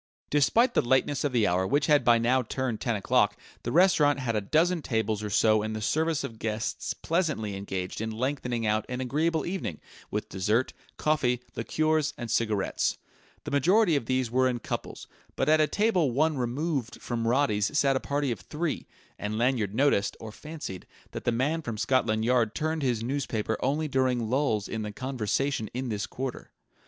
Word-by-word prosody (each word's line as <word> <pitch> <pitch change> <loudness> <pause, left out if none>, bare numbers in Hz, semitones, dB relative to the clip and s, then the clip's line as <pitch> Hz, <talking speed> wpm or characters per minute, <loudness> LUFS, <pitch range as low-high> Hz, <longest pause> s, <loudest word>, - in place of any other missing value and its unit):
Despite 185 - +3
the - - +4
lateness 130 +3 +1
of 145 - 0
the 120 -4 +2
hour, 90 +1 +1
which 145 +5 +2
had 150 -1 +4
by 120 -1 +5
now 120 +3 +2
turned 125 -1 -3
ten 120 -3 0
o'clock, 105 0 +2 0.2
the 120 - -3
restaurant 155 -4 +4
had 125 -4 -2
a 105 - +1
dozen 165 - +2
tables 110 -5 -1
or 105 - -4
so 110 +1 +4
in 110 +1 -3
the 110 - -3
service 155 +8 0
of 110 -1 -7
guests 110 +1 -3
pleasantly 155 - -1
engaged 95 0 -4
in 110 - -2
lengthening 125 0 -2
out 105 0 +1
an 125 0 -3
agreeable 155 +5 0
evening 175 - -4 0.3
with - - -3
dessert, 105 +7 0 0.2
coffee, 140 -6 +1 0.2
liqueurs 155 -2 0
and 120 -2 -5
cigarettes. 110 -4 0 0.5
The - - -6
majority 175 - +4
of 135 -5 -1
these 130 -2 0
were 130 +1 +3
in 125 - -1
couples, 115 - -6 0.3
but - - 0
at 155 0 +5
a 155 - +4
table 195 -8 +2
one 155 +5 +2
removed 130 0 -2
from 115 -2 -3
Roddy's 120 -1 +1
sat 140 -2 +3
a - - +2
party 140 -1 -1
of 115 - -3
three; 150 - -3 0.3
and 105 +1 -3
Lanyard 115 -4 +1
noticed, 130 -6 +2
or 110 -1 -8
fancied, 150 - -8 0.2
that - - -7
the 120 - +3
man 145 +8 0
from 115 -7 -5
Scotland 110 -2 +1
Yard 120 -3 +2
turned 160 0 -1
his 120 -5 0
newspaper 115 -4 -1
only 150 +4 0
during 130 -4 +1
lulls 125 -7 +1
in 110 - -4
the 105 -1 -4
conversation 130 0 -2
in 130 0 -2
this 105 -2 -2
quarter. 130 0 -5
125 Hz, 185 wpm, -28 LUFS, 110-145 Hz, 0.5 s, by